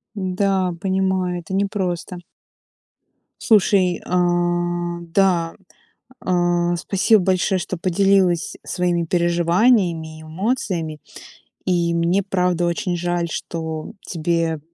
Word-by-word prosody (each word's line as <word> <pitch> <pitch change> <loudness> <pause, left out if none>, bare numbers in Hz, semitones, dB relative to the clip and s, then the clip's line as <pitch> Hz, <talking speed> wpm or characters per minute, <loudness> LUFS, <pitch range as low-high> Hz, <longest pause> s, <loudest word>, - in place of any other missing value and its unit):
Да, 185 -1 0
понимаю, 190 -2 0
это 175 +3 -8
не 200 +1 +2
просто. 180 -2 -3 1.2
Слушай, 190 -5 +3
а, 175 -1 0
да, 170 -1 +1 0.7
а, 175 -1 +1
спасибо 195 +4 +3
большое, 185 +1 +1
что 180 +2 -4
поделилась 185 0 +2
своими 175 -2 0
переживаниями 170 -1 +2
и - - -11
эмоциями, 170 - -2 0.7
и 175 -2 +1
мне 170 +4 +2
правда 180 -2 0
очень 175 +1 -1
жаль, 175 0 -1
что 160 -1 -5
тебе 165 -2 -1
175 Hz, 100 wpm, -21 LUFS, 170-190 Hz, 1.2 s, Слушай